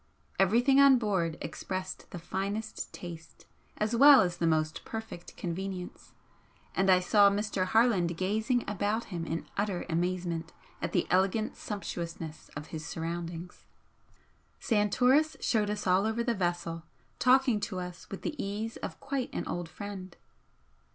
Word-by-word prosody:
Everything 240 +8 +4
on 275 -2 +8
board 190 -8 0
expressed 185 0 -5
the 180 - -7
finest 200 +5 -4
taste 170 -2 -10 0.3
as 215 +2 0
well 280 +3 +9
as 175 -1 0
the 170 - +1
most 155 -1 0
perfect 220 -6 -7
convenience, 185 +1 -5 0.6
and 195 0 +2
I 185 -1 +7
saw 200 +2 +5
Mr. 200 -2 -1
Plarland 195 -7 +3
gazing 220 +6 0
about 210 +3 -1
him 165 -1 -3
in 165 - -3
utter 200 -3 -1
amazement 170 -1 -1 0.3
at - - -2
the - - +1
elegant 195 +4 +2
sumptuousness 170 -6 -6
of 150 +1 -8
his 155 -1 -4
surroundings. 170 +1 -5 0.9
Santoris 250 +8 +3
showed 210 -3 +1
us 210 -1 -3
all 185 +3 +3
over 225 +1 0
the 235 -1 +1
vessel, 175 -4 -2 0.4
talking 255 -3 +4
to 190 -2 -3
us 180 -1 -8
with 195 - -7
the - - -2
ease 210 +3 -4
of - - -6
quite 275 -2 -2
an - - -3
old 175 -2 -4
friend. 190 -1 -8
195 Hz, 145 wpm, -30 LUFS, 175-220 Hz, 0.9 s, well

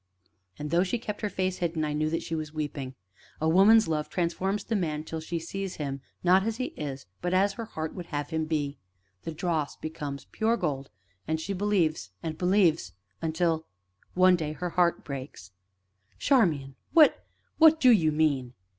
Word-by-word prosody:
And, 150 0 -5
though 170 - +4
she 195 +6 -1
kept 210 -2 -6
her 210 - -1
face 185 -1 -1
hidden, 165 -3 -1
I 150 - -2
knew 155 +1 0
that 165 - -2
she 165 - -5
was 155 -2 -3
weeping. 140 -3 -4 0.4
"A 155 - 0
woman's 205 +6 +6
love 155 -2 -1
transforms 190 +3 -1
the 225 - -2
man 155 -6 -1
till 160 0 -5
she 165 +2 -4
sees 190 +3 -5
him, 140 -2 -4 0.2
not 185 +2 +5
as 225 +1 -2
he 255 - -3
is, 135 -3 -5 0.2
but 180 +1 0
as 195 +2 +3
her 230 +3 -6
heart 160 -7 -5
would 175 -2 -7
have 145 +1 -4
him 160 0 0
be; 150 -3 -2 0.5
the - - -3
dross 160 -2 -2
becomes 145 -4 -6
pure 225 +2 +1
gold, 140 -7 -2 0.4
and 160 +1 0
she 195 +5 -3
believes 180 - 0
and 160 -1 -3
believes 180 -1 +2 0.3
until 160 0 0 0.5
one 185 0 +6
day 155 -3 -3
her 175 +2 -4
heart 175 -1 +2
breaks 130 -9 -7 0.3
" 95 +1 -39
"Charmian! 160 - +2 0.2
what 315 -3 +6 0.4
what 320 0 +7
do 255 -4 +7
you 165 -9 +4
mean?" 140 -5 +1
165 Hz, 185 wpm, -28 LUFS, 150-190 Hz, 0.5 s, what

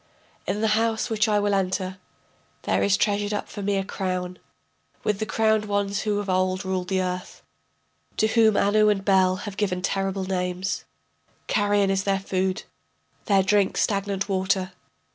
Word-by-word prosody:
In 210 - -1
the 220 - +2
house 225 +2 +1
which 215 0 +2
I 210 -1 +2
will 205 0 +1
enter 190 -1 -1 0.6
There - - +1
is 200 0 +3
treasured 205 0 0
up - - -4
for 205 - -7
me 200 0 0
a 195 - 0
crown, 185 -2 -3 0.6
With 210 -2 0
the 220 - -2
crowned 220 -1 +2
ones 200 0 -1
who 210 -1 0
of 205 0 -3
old 185 0 0
ruled 185 -1 -2
the 190 -1 0
earth, 180 0 -5 0.7
To - - +3
whom 220 -1 +4
Anu 210 +1 +4
and 195 -2 0
Bel 190 -2 +4
have 200 -2 -7
given 180 -3 -1
terrible 195 0 -1
names, 185 +1 -2 0.6
Carrion 205 -1 +2
is 195 0 0
their 195 -1 +1
food, 190 -1 -1 0.6
their 195 -3 +3
drink 200 0 +2
stagnant 200 -1 0
water. 190 -1 0
195 Hz, 165 wpm, -24 LUFS, 190-205 Hz, 0.7 s, whom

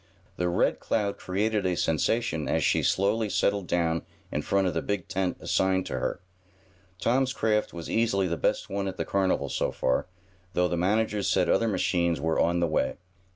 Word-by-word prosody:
The 90 0 0
Red 85 - +1
Cloud 100 -2 -1
created 105 +3 0
a 90 -2 0
sensation 80 +1 0
as 80 - +1
she - - +3
slowly 105 +3 +1
settled 100 -2 +1
down 80 -2 +1 0.3
in - - -1
front 100 -1 +1
of 90 - 0
the - - -1
big 100 -3 -3
tent 95 -1 -1
assigned 95 -1 +1
to - - -3
her. - - -2 0.8
Tom's 130 +2 +1
craft 105 -3 +1
was 85 -1 -7
easily 110 -4 +1
the 85 - -1
best - - 0
one 100 0 -2
at 95 - -5
the - - -2
carnival, 95 -1 +1
so - - -1
far, 65 - 0 0.5
though 90 0 +2
the 90 - -1
managers 105 +3 +1
said 90 -2 +2
other 115 - +3
machines 85 -5 +1
were 80 +2 0
on 85 +1 +2
the 85 - +2
way. 80 - 0
95 Hz, 190 wpm, -27 LUFS, 85-105 Hz, 0.8 s, she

